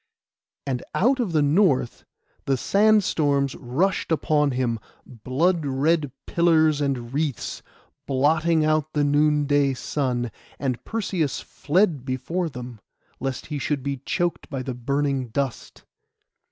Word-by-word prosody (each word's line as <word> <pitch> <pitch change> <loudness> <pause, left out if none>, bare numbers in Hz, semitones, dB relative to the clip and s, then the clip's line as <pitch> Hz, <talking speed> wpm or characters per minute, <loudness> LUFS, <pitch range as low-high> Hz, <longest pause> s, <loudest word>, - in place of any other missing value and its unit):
And 130 -3 -2
out 260 +6 +3
of 225 -7 0
the 155 -2 +3
north 145 - +2 0.4
the 135 -1 +1
sandstorms 160 - +2
rushed 160 +10 -1
upon 150 -2 +2
him, 125 -3 -1 0.3
blood 140 +8 0
red 145 +2 +1
pillars 160 -3 +3
and 130 -4 -2
wreaths, 145 -3 -2 0.5
blotting 155 +4 +2
out 155 0 +1
the 150 - +2
noonday 145 -1 +2
sun; 125 -3 -2 0.3
and 130 -3 -2
Perseus 185 -9 -2
fled 165 -4 0
before 140 +7 -2
them, 125 -4 -8 0.4
lest 135 -1 -3
he 145 - -2
should 140 0 -2
be 140 0 -2
choked 175 +6 -2
by 135 -3 -4
the 130 - -4
burning 135 +1 -1
dust. 130 +2 -4
145 Hz, 125 wpm, -24 LUFS, 130-160 Hz, 0.5 s, out